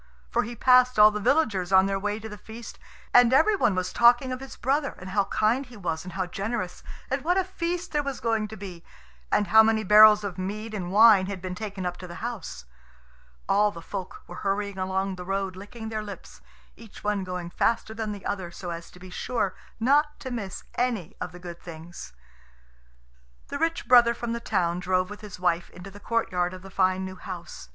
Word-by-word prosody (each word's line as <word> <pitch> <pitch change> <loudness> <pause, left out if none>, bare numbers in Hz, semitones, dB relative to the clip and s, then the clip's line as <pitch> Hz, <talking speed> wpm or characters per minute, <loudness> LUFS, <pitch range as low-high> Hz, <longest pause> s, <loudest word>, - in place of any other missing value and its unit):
For - - +2
he 235 +3 -6
passed 250 +1 +5
all 210 0 +8
the 210 - -3
villagers 210 - +1
on 190 0 +6
their 195 0 -1
way 210 +2 -2
to 220 - -7
the 210 - -8
feast; 225 +2 -10 0.3
and 245 -1 +7
every 320 +11 +5
one 210 - +2
was 185 0 -2
talking 245 +2 +5
of 255 - -3
his 270 0 -9
brother, 275 +3 0
and 185 +1 -9
how 200 0 +2
kind 220 +6 +1
he 245 -3 -13
was 165 -4 -3
and 180 -1 -9
how 190 -1 -1
generous, 195 0 -4 0.3
and 270 0 -1
what 355 +4 +2
a 380 - +3
feast 355 -1 -3
there 295 - +1
was 275 -3 -4
going 225 -2 0
to 220 +1 -9
be, 180 -4 -9 0.5
and 205 - +2
how 220 0 +8
many 220 0 +2
barrels 210 +1 +8
of 190 -2 -5
mead 215 +4 -4
and, 180 -4 -4
wine 205 -2 +7
had 200 -1 -5
been 185 0 -5
taken 195 -1 -5
up 180 0 -3
to 180 - -9
the 175 - -9
house. 215 - -6 0.8
All 210 +1 +4
the 170 - -9
folk 190 +1 -7
were 175 - -10
hurrying 200 0 -2
along 190 0 -1
the 180 - -6
road 195 0 -2
licking 220 +4 -8
their 220 -1 -3
lips, 205 -2 -10 0.3
each 225 -3 -14
one 205 -2 0
going 180 -2 -5
faster 225 +2 0
than 220 -1 -3
the 205 -2 -8
other 190 -4 -3
so 175 +1 -7
as 170 0 -7
to 180 - -16
be 185 0 -11
sure 215 -2 -2 0.3
not 290 +5 +2
to 260 - -6
miss 200 -6 -5
any 225 -7 -2
of - - -4
the 180 - -11
good 175 -1 -9
things. 165 - -10 1.4
The - - -4
rich 330 -5 -1
brother 240 -1 +6
from 235 -1 -3
the 235 - -3
town 175 -6 0
drove 185 +1 0
with 205 - -9
his 210 -4 -9
wife 175 -1 0
into 185 +2 -11
the 205 - -12
courtyard 185 -6 -1
of 185 - -12
the 195 - -11
fine 185 0 +1
new 185 0 -7
house. 175 - -8
205 Hz, 220 wpm, -26 LUFS, 185-230 Hz, 1.4 s, all